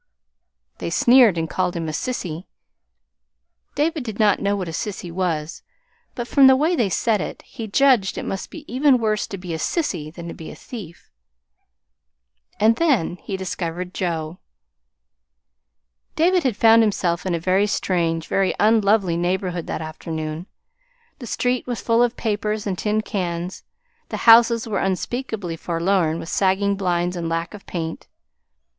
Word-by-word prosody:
They -, -, -3 dB
sneered 240 Hz, -7 st, +5 dB
and 165 Hz, 0 st, -1 dB
called 180 Hz, +1 st, -1 dB
him 165 Hz, -1 st, -3 dB
a -, -, -2 dB
sissy. 175 Hz, -3 st, -4 dB, 1.3 s
David 305 Hz, 0 st, 0 dB
did 220 Hz, -4 st, -6 dB
not 210 Hz, -3 st, +3 dB
know 200 Hz, 0 st, +1 dB
what 190 Hz, -3 st, -3 dB
a -, -, -4 dB
sissy 185 Hz, 0 st, -5 dB
was; 165 Hz, -4 st, -2 dB, 0.5 s
but 240 Hz, -1 st, -4 dB
from 275 Hz, +1 st, +6 dB
the 265 Hz, -, +7 dB
way 315 Hz, +6 st, +2 dB
they 230 Hz, -10 st, +1 dB
said 215 Hz, +1 st, +1 dB
it, -, -, -6 dB
he 230 Hz, -4 st, -8 dB
judged 240 Hz, -3 st, +3 dB
it -, -, -4 dB
must 195 Hz, -, -4 dB
be 315 Hz, -2 st, -10 dB
even 265 Hz, +1 st, +3 dB
worse 215 Hz, -3 st, 0 dB
to 195 Hz, -, -6 dB
be 180 Hz, -2 st, -6 dB
a 160 Hz, -, -3 dB
sissy 160 Hz, -, -2 dB
than 170 Hz, +1 st, -9 dB
to 170 Hz, -, -6 dB
be 160 Hz, -, -9 dB
a -, -, -9 dB
thief. 190 Hz, -9 st, -10 dB, 1.5 s
And 220 Hz, +2 st, +4 dB
then 265 Hz, -, +1 dB
he 195 Hz, +2 st, -5 dB
discovered 180 Hz, -1 st, -4 dB
Joe. 165 Hz, -1 st, -3 dB, 1.8 s
David 360 Hz, +2 st, +3 dB
had 255 Hz, -8 st, -1 dB
found 225 Hz, 0 st, +6 dB
himself 180 Hz, -5 st, 0 dB
in 185 Hz, -2 st, -1 dB
a -, -, -2 dB
very 190 Hz, +4 st, +2 dB
strange, 165 Hz, -5 st, 0 dB
very 195 Hz, -1 st, 0 dB
unlovely 210 Hz, -4 st, +3 dB
neighborhood 180 Hz, -1 st, -2 dB
that 160 Hz, -, -3 dB
afternoon. 155 Hz, +1 st, -5 dB, 0.7 s
The 240 Hz, -, -8 dB
street 250 Hz, +3 st, -1 dB
was 245 Hz, -2 st, -3 dB
full 230 Hz, 0 st, +2 dB
of 245 Hz, 0 st, +1 dB
papers 210 Hz, -1 st, -2 dB
and 195 Hz, -3 st, -1 dB
tin 210 Hz, +3 st, 0 dB
cans, 180 Hz, -3 st, -4 dB, 0.5 s
the -, -, -3 dB
houses 230 Hz, 0 st, +6 dB
were 215 Hz, -, -1 dB
unspeakably 195 Hz, -2 st, -3 dB
forlorn 170 Hz, -1 st, 0 dB
with 165 Hz, -, -7 dB
sagging 200 Hz, +1 st, +1 dB
blinds 180 Hz, -2 st, -1 dB
and 170 Hz, -2 st, -3 dB
lack 165 Hz, +2 st, -2 dB
of 205 Hz, -, -12 dB
paint. 165 Hz, -2 st, -5 dB
195 Hz, 160 wpm, -22 LUFS, 170-230 Hz, 1.8 s, the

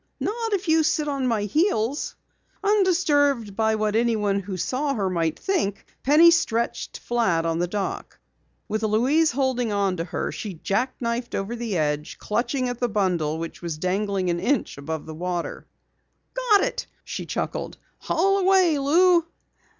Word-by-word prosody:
"Not 450 Hz, +1 st, -2 dB
if 385 Hz, -3 st, -1 dB
you 320 Hz, 0 st, +4 dB
sit 310 Hz, -1 st, +1 dB
on 275 Hz, -3 st, -1 dB
my 225 Hz, -4 st, +1 dB
heels." 275 Hz, -, 0 dB, 0.5 s
Undisturbed 295 Hz, -, +2 dB
by 220 Hz, 0 st, +2 dB
what 215 Hz, -1 st, 0 dB
anyone 215 Hz, -4 st, +1 dB
who 190 Hz, -1 st, -5 dB
saw 275 Hz, -, -1 dB
her 195 Hz, -4 st, -1 dB
might 165 Hz, -3 st, 0 dB
think, 330 Hz, -, -1 dB, 0.2 s
Penny 315 Hz, +5 st, +7 dB
stretched 235 Hz, -9 st, 0 dB
flat 195 Hz, -9 st, 0 dB
on 165 Hz, 0 st, 0 dB
the 175 Hz, -, +1 dB
dock. 200 Hz, +2 st, -4 dB, 0.5 s
With 215 Hz, +1 st, -2 dB
Louise 255 Hz, +9 st, +3 dB
holding 255 Hz, -3 st, 0 dB, 0.3 s
to 165 Hz, -, -1 dB
her, 180 Hz, -, -3 dB
she 205 Hz, -4 st, -6 dB
jack 225 Hz, +10 st, -1 dB
knifed 235 Hz, +1 st, -2 dB
over 200 Hz, +5 st, -3 dB
the 230 Hz, -5 st, -2 dB
edge, 150 Hz, -1 st, -1 dB
clutching 250 Hz, +4 st, -1 dB
at 245 Hz, -1 st, -4 dB
the 245 Hz, -, 0 dB
bundle 180 Hz, -7 st, 0 dB
which 165 Hz, 0 st, -6 dB, 0.2 s
dangled 195 Hz, +2 st, 0 dB
an 170 Hz, -1 st, 0 dB
inch 265 Hz, +10 st, 0 dB
above 160 Hz, +2 st, -5 dB
the 160 Hz, -, -7 dB
water. 175 Hz, +1 st, -4 dB, 0.7 s
"Got -, -, +3 dB
it!" -, -, -2 dB, 0.2 s
she -, -, -6 dB
chuckled. -, -, -3 dB, 0.2 s
"Haul 390 Hz, +4 st, +1 dB
away, 370 Hz, -5 st, +4 dB
Lou." 335 Hz, +4 st, +4 dB
235 Hz, 155 wpm, -24 LUFS, 195-315 Hz, 0.7 s, Penny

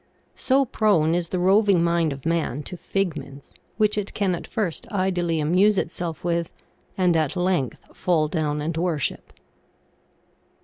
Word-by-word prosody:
So 270 Hz, +1 st, +2 dB
prone 195 Hz, -9 st, +2 dB
is 170 Hz, -1 st, -1 dB
the 185 Hz, -, -2 dB
roving 190 Hz, 0 st, +4 dB
mind 170 Hz, -2 st, +2 dB
of 135 Hz, +1 st, -8 dB
man 160 Hz, -4 st, -1 dB
to 180 Hz, -, -7 dB
fig 185 Hz, -1 st, -2 dB
ments, 140 Hz, -2 st, -10 dB, 0.2 s
which 215 Hz, -1 st, +2 dB
it 200 Hz, -, -5 dB
can 195 Hz, -3 st, +1 dB
at 170 Hz, -, -5 dB
first 195 Hz, -8 st, -3 dB
idly 180 Hz, -4 st, 0 dB
amuse 185 Hz, +7 st, +3 dB
itself 170 Hz, -2 st, -3 dB
with, 170 Hz, -1 st, -1 dB, 0.5 s
and 180 Hz, -2 st, +3 dB
at 155 Hz, -3 st, +1 dB
length 180 Hz, -, -1 dB
fall 165 Hz, -4 st, +1 dB
down 150 Hz, -2 st, -1 dB
and 160 Hz, +2 st, -2 dB
worship. 165 Hz, -4 st, -2 dB
175 Hz, 150 wpm, -24 LUFS, 160-190 Hz, 0.5 s, roving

